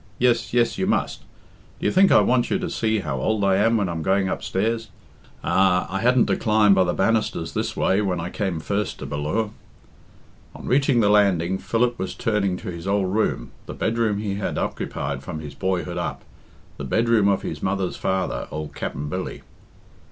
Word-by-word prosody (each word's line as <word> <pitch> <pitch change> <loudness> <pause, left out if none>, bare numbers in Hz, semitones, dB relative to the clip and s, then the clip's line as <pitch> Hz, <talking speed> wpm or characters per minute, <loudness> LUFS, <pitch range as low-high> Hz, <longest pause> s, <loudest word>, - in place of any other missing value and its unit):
Yes, 120 -1 +2
yes, 120 -1 +1
you - - 0
must. - - 0 0.6
Do - - -5
you - - +3
think 190 +1 +5
I - - +7
want 125 -1 +2
you - - +1
to 185 -2 -4
see 110 -1 0
how 70 -7 -3
old 110 +4 0
I 95 -1 +3
am 115 +3 +3
when 100 -3 0
I'm 85 -2 -3
going 95 +2 +1
upstairs? 115 +5 -2 0.5
Ah! 90 +2 +3
I 95 - 0
hadn't 125 +2 +4
to - - +1
climb 105 -2 +4
by 95 -1 +4
the 85 - +1
banisters 105 -6 0
this - - -2
way 95 +2 +2
when 95 -4 -1
I 85 +2 -4
came 95 -6 -2
first 100 +4 -2
to - - -7
Bal 75 - -4
lure." 105 +9 -1 1.0
On - - -10
reaching 135 -2 +3
the 105 - +3
landing, 95 -3 +3
Philip 120 +1 0
was 95 - -4
turning 100 -4 0
to 100 -2 -6
his 85 +1 -7
old 100 -1 +1
room, 110 +1 0 0.2
the - - -6
bedroom 110 -2 0
he 100 -1 -3
had 100 - -3
occupied 70 -1 -3
from 80 +3 -6
his 75 -2 -8
boyhood 90 +1 -2
up, - - -4 0.5
the - - -6
bedroom 110 - +2
of 100 -1 +1
his 75 -1 -5
mother's 95 -1 -1
father, 95 -1 -2
old 75 -2 -6
Capt'n 70 +1 -4
Billy. 90 +5 -5
100 Hz, 195 wpm, -23 LUFS, 90-110 Hz, 1.0 s, I